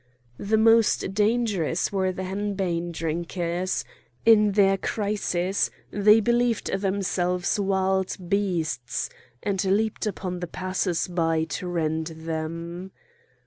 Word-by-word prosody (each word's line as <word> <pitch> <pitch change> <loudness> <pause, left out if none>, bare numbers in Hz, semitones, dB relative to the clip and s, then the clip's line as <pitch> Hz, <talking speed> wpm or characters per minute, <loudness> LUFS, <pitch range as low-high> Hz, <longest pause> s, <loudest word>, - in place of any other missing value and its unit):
The 215 +2 +1
most 225 -3 +4
dangerous 210 -6 +1
were 190 -2 +1
the 185 +1 -5
henbane 190 -3 -2
drinkers; 170 +2 -2 0.4
in 210 -2 +6
their 195 -1 +4
crisis 195 -2 -1 0.2
they 210 +2 +5
believed 235 +1 +1
themselves 190 -1 0
wild 190 -1 +1
beasts, 170 - -1 0.3
and 195 -1 0
leaped 215 +3 0
upon 185 -3 -4
the 175 - -4
passers 185 0 -1
by 165 -3 +1
to 160 +3 -4
rend 160 -2 -1
them. 165 +3 -5
190 Hz, 105 wpm, -25 LUFS, 170-205 Hz, 0.4 s, in